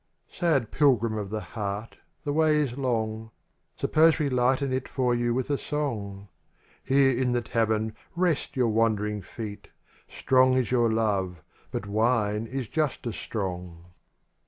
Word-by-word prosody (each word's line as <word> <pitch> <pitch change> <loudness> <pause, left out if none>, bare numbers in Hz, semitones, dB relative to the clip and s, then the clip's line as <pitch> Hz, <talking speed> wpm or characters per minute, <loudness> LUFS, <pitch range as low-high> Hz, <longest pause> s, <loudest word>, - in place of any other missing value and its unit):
^AD 150 - +2
pilgrim 120 -6 +3
of 105 -2 -4
the 110 +1 -3
heart, 105 0 -4 0.3
the 145 - -1
way 155 0 +3
is 145 -5 0
long. 110 -4 -2 0.5
Suppose 160 +1 +4
we 150 -3 0
lighten 130 +1 +1
it 130 0 -2
for 125 -2 +1
you 120 0 +1
with 130 +3 -1
a 140 - 0
song; 105 -9 -3 0.6
Here 135 -1 +3
in 125 0 +1
the 120 - +1
tavern 110 -1 0 0.2
rest 175 -3 0
your 125 -3 +2
wandering 105 -2 +1
feet. 105 0 -8 0.4
Strong 130 0 +3
is 130 -2 0
your 120 -3 +3
love, 100 -6 0 0.3
but - - -4
wine 110 0 +1
is 130 -1 -4
just 150 -2 -1
as 115 - -3
strong. 90 -4 -5
120 Hz, 150 wpm, -27 LUFS, 105-135 Hz, 0.6 s, Suppose